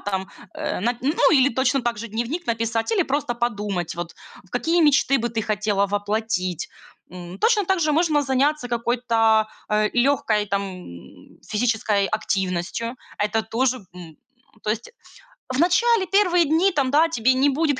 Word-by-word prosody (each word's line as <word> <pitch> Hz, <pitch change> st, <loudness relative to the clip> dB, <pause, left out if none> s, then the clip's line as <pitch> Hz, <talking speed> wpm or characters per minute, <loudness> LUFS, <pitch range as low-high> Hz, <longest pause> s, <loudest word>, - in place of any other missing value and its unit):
там, 190 Hz, -1 st, -3 dB, 0.3 s
э -, -, -3 dB
Нап 235 Hz, +4 st, 0 dB
ну, 290 Hz, +6 st, +2 dB
или 270 Hz, -2 st, +5 dB
точно 260 Hz, +1 st, +1 dB
также 235 Hz, -1 st, -3 dB
дневник 240 Hz, -, -4 dB
написать 230 Hz, -, -1 dB
или 390 Hz, -6 st, +2 dB
просто 270 Hz, -4 st, -1 dB
подумать, 205 Hz, -7 st, -2 dB
вот 175 Hz, 0 st, -6 dB, 0.4 s
какие 335 Hz, +1 st, +1 dB
мечты 275 Hz, -2 st, +4 dB
бы 235 Hz, +1 st, -1 dB
ты 225 Hz, -1 st, -3 dB
хотела 210 Hz, -1 st, 0 dB
воплотить. 205 Hz, -3 st, -2 dB, 0.4 s
М, 180 Hz, +1 st, -9 dB
точно 430 Hz, -, +3 dB
также 340 Hz, -5 st, +1 dB
можно 310 Hz, -2 st, +2 dB
заняться 275 Hz, 0 st, 0 dB
какой-то, 230 Hz, -2 st, +2 dB, 0.2 s
э, 210 Hz, 0 st, +1 dB
лёгкой 240 Hz, -5 st, +1 dB
там 195 Hz, -2 st, -3 dB, 0.6 s
физической 215 Hz, -2 st, 0 dB
активностью. 195 Hz, +3 st, -2 dB, 0.2 s
Это 210 Hz, +2 st, 0 dB
тоже, 250 Hz, +4 st, 0 dB, 0.2 s
м 170 Hz, -4 st, -11 dB, 0.5 s
то 210 Hz, -, 0 dB
есть, 225 Hz, +2 st, -4 dB, 0.6 s
в 255 Hz, -, -1 dB
начале, 385 Hz, +5 st, +3 dB
первые 360 Hz, -3 st, +3 dB
дни, 325 Hz, +6 st, +3 dB
там, 280 Hz, -6 st, 0 dB
да, 315 Hz, +3 st, +4 dB
тебе 255 Hz, -4 st, +2 dB
не 270 Hz, +2 st, +3 dB
будет 290 Hz, -1 st, 0 dB
235 Hz, 150 wpm, -23 LUFS, 210-285 Hz, 0.6 s, или